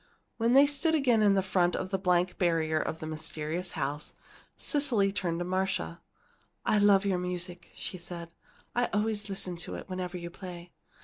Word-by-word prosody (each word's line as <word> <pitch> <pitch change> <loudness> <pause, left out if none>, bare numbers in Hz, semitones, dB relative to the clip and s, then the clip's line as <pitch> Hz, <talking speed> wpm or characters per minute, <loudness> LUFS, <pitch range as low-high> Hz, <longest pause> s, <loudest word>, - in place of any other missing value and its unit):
When 230 +1 +2
they 275 +2 +8
stood 295 +3 +1
again 250 -7 +3
in 200 -2 +5
front 180 -2 +2
of 185 - -3
the 195 -1 -1
blank 180 -1 +1
barrier 160 -3 +2
to - - -1
the 160 0 -8
mysterious 155 +2 -1
house, 145 0 -2 0.4
Cecily 245 -10 +1
turned 175 -4 -1
to 175 - -2
Marcia. 185 -2 -1 0.6
"I 210 - +3
love 200 -1 +5
your 190 -2 +1
music," 180 0 -3
she 185 - -5
said. 170 -1 -6 0.4
"I 245 0 +3
always 210 0 0
listen 185 -2 -4
to 170 - -5
it - - -7
whenever 185 -1 -4
you 170 -1 -6
play. 175 -1 -9
180 Hz, 175 wpm, -30 LUFS, 170-205 Hz, 0.6 s, they